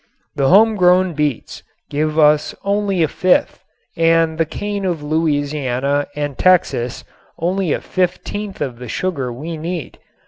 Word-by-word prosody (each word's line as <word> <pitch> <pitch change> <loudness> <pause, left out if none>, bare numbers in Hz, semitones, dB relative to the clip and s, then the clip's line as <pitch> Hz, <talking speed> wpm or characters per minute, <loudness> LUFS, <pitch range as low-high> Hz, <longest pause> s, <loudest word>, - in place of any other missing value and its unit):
The 135 -2 +2
homegrown 185 -3 +4
beets 150 -5 -2 0.3
give 155 +1 -1
us 150 -1 +3
only 200 -3 +1
a - - +2
fifth 180 +4 +1 0.3
and 165 -1 +2
the 165 - +2
cane 205 +3 -4
of 175 -5 -2
Louisiana 145 -3 0
and 145 -2 -3
Texas 170 -9 +2 0.3
only 180 0 -1
a - - 0
fifteenth 195 +2 -3
of 125 -5 -3
the 125 - -8
sugar 140 -8 -2
we 155 +7 -6
need. 165 +1 -5
160 Hz, 135 wpm, -18 LUFS, 145-185 Hz, 0.3 s, homegrown